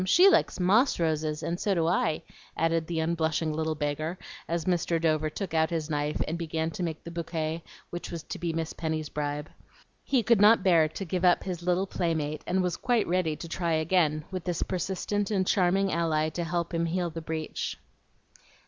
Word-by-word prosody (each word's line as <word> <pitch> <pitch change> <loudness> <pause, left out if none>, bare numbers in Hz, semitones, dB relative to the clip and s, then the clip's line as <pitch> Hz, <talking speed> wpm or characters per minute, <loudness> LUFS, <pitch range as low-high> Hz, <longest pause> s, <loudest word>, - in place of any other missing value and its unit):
She 350 - +6
likes - - +2
MOSS 210 +9 +3
roses, 155 -1 0
and 175 +1 -2
so 200 -2 +1
do 165 -2 +1
I," 160 -2 +1 0.3
added 165 0 +1
the 170 -2 -2
unblushing 160 -1 0
little 160 0 -1
beggar, 155 +3 -2 0.3
as 170 -1 -2
Mr. 175 -2 +1
Dover 155 -1 +1
took 185 +2 -5
out 160 0 +3
his 165 -2 -2
knife 150 0 -1
and 165 +2 -3
began 160 -1 -2
to 175 - -6
make 165 -3 -3
the 170 - -7
bouquet 165 -1 -3 0.3
which 175 - -5
was 165 -2 -5
to - - -6
be 170 0 -1
Miss 165 -1 -3
Penny's 155 -2 -3
bribe. 145 +1 -3 0.5
He 255 -4 +2
could 230 -2 +4
not 210 -1 +7
bear 170 -4 +5
to 175 +5 -6
give 180 +1 -2
up 180 -1 +4
his 180 -3 -4
little 180 +2 +1
playmate, 160 -5 -1
and 185 +1 +1
was 180 -1 -1
quite 240 -4 +1
ready 175 -3 +1
to 170 - -8
try 170 0 -1
again, 155 -2 +2
with 185 -2 -4
this 175 -2 -1
persistent 190 +2 -2
and 195 -3 +1
charming 190 +1 +2
ally 155 -2 +1
to 170 +2 -3
help 170 +1 -2
him 170 0 +1
heal 175 0 -1
the 165 +1 -6
breach. 160 -1 -4
165 Hz, 200 wpm, -28 LUFS, 155-180 Hz, 0.5 s, not